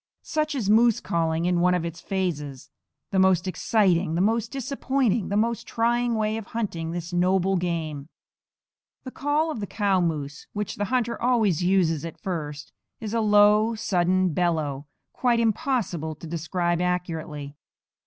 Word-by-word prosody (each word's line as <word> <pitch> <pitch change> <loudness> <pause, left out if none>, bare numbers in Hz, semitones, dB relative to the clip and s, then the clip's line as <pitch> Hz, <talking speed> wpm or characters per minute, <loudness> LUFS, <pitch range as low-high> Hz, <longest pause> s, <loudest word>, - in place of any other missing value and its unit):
Such 305 -1 -1
is 235 -7 -2
moose 225 +2 +4
calling, 165 0 -1
in 180 -1 +2
one 180 0 +4
of 175 -2 -1
its 170 +1 -6
phases 150 -9 -3 0.4
the 195 - +2
most 190 -1 +3
exciting, 185 -2 +1
the - - 0
most 220 +4 +1
disappointing, 265 -4 -1
the 200 - 0
most 230 +2 0
trying 235 +1 +1
way 215 0 0
of 220 -3 -7
hunting 170 -8 -2
this 170 +1 -5
noble 185 +2 +2
game. 160 -5 -3 0.9
The 255 - -7
call 295 +4 0
of 265 - -5
the 200 - -4
cow 200 -3 +1
moose, 150 -4 -3
which 210 -1 -4
the 205 - -1
hunter 235 0 -1
always 225 -9 +2
uses 175 -4 +2
at 165 -1 -7
first, 150 -5 -5 0.3
is 220 -1 -5
a 230 - +1
low, 210 +1 +4
sudden 185 -3 +1
bellow, 155 -5 -1 0.3
quite 240 -2 +2
impossible 220 - -1
to 155 - -11
describe 170 +1 -1
accurately. 160 -5 -3
185 Hz, 155 wpm, -25 LUFS, 165-225 Hz, 0.9 s, moose